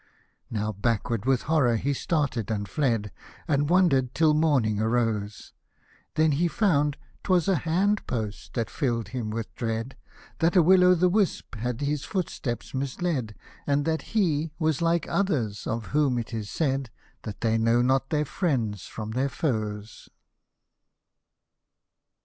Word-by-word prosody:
109 105 Hz, -1 st, -2 dB
Now -, -, -1 dB
backward 115 Hz, +1 st, -1 dB
with 130 Hz, -2 st, +2 dB
horror 145 Hz, -7 st, +2 dB
he 140 Hz, +6 st, 0 dB
started 140 Hz, -, -1 dB
and 100 Hz, -2 st, -2 dB
fled, 115 Hz, -9 st, 0 dB, 0.4 s
And 145 Hz, -2 st, +1 dB
wander'd 155 Hz, -9 st, +3 dB
till 160 Hz, -2 st, +4 dB
morning 140 Hz, -9 st, +2 dB
arose; 110 Hz, -2 st, -1 dB, 0.6 s
Then 155 Hz, 0 st, +3 dB
he 160 Hz, +5 st, +2 dB
found 150 Hz, -6 st, +1 dB, 0.2 s
'twas 180 Hz, -3 st, +2 dB
a 190 Hz, -3 st, +3 dB
hand 190 Hz, +7 st, 0 dB
post 110 Hz, -4 st, -4 dB
had 115 Hz, -2 st, -2 dB
fill'd 120 Hz, -5 st, -1 dB
him 120 Hz, -4 st, -4 dB
with 110 Hz, 0 st, -5 dB
dread, 115 Hz, +2 st, -3 dB, 0.4 s
That 170 Hz, +3 st, +2 dB
a 180 Hz, -, +7 dB
rvill 180 Hz, +1 st, +6 dB
rvith 175 Hz, -, -2 dB
a -, -, +7 dB
whisp 200 Hz, +1 st, 0 dB
had 120 Hz, +2 st, -3 dB
his 145 Hz, 0 st, -1 dB
footsteps 155 Hz, -, -4 dB
misled, 135 Hz, -, -2 dB, 0.3 s
And 145 Hz, 0 st, +1 dB
that 160 Hz, -1 st, 0 dB, 0.2 s
he 160 Hz, -6 st, +2 dB
was 155 Hz, -3 st, 0 dB
like 170 Hz, 0 st, +2 dB
others, 135 Hz, -, -1 dB
of 115 Hz, -1 st, -2 dB
whom 145 Hz, -4 st, +2 dB
it 120 Hz, 0 st, -4 dB
is 110 Hz, -3 st, -4 dB
said, 135 Hz, -5 st, -1 dB, 0.3 s
That 105 Hz, -2 st, -8 dB
they 115 Hz, -1 st, +2 dB
know 115 Hz, +2 st, +3 dB
not 135 Hz, +1 st, +1 dB
their/Hewcfo 140 Hz, -, 0 dB
from 110 Hz, +4 st, -7 dB
their 130 Hz, +4 st, 0 dB
foes. 110 Hz, -7 st, -3 dB
135 Hz, 150 wpm, -26 LUFS, 115-160 Hz, 0.6 s, a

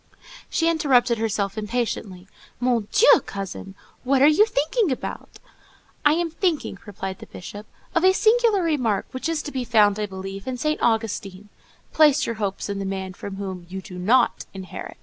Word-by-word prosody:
She 330 Hz, -, +1 dB
interrupted 255 Hz, -8 st, +3 dB
herself 205 Hz, -2 st, -1 dB
impatiently: 210 Hz, -4 st, -3 dB, 0.3 s
"Mon 240 Hz, -4 st, +1 dB
Dieu, 460 Hz, +4 st, +6 dB
cousin! 195 Hz, 0 st, -6 dB, 0.3 s
What 265 Hz, +1 st, +3 dB
are -, -, +8 dB
you 335 Hz, +9 st, +5 dB
thinking 400 Hz, -, 0 dB
about?" 260 Hz, -, -6 dB, 0.7 s
"I 295 Hz, -, +5 dB
am 335 Hz, 0 st, -1 dB
thinking," 325 Hz, -, -1 dB
replied 190 Hz, -2 st, -6 dB
the -, -, -11 dB
Bishop, 205 Hz, +4 st, -9 dB, 0.3 s
"of 335 Hz, -, +1 dB
a 375 Hz, -, +7 dB
singular 440 Hz, -1 st, +3 dB
remark, 250 Hz, -, 0 dB
which 260 Hz, +5 st, -3 dB
is 320 Hz, -2 st, -1 dB
to 290 Hz, -, -6 dB
be 260 Hz, -2 st, -2 dB
found, 215 Hz, -3 st, +3 dB
I 210 Hz, -, -1 dB
believe, 195 Hz, +1 st, -7 dB
in 255 Hz, -1 st, -3 dB
St. 305 Hz, +4 st, -1 dB
Augustine,—'Place 225 Hz, +7 st, 0 dB
your 230 Hz, -, -3 dB
hopes 195 Hz, -1 st, -2 dB
in 200 Hz, -1 st, -3 dB
the -, -, -3 dB
man 190 Hz, -1 st, -4 dB
from 195 Hz, +1 st, -7 dB
whom 190 Hz, -3 st, -6 dB
you 190 Hz, +1 st, -5 dB
do 185 Hz, -2 st, -9 dB
not 235 Hz, +7 st, +2 dB
inherit. 185 Hz, -2 st, -8 dB
225 Hz, 170 wpm, -23 LUFS, 195-300 Hz, 0.7 s, are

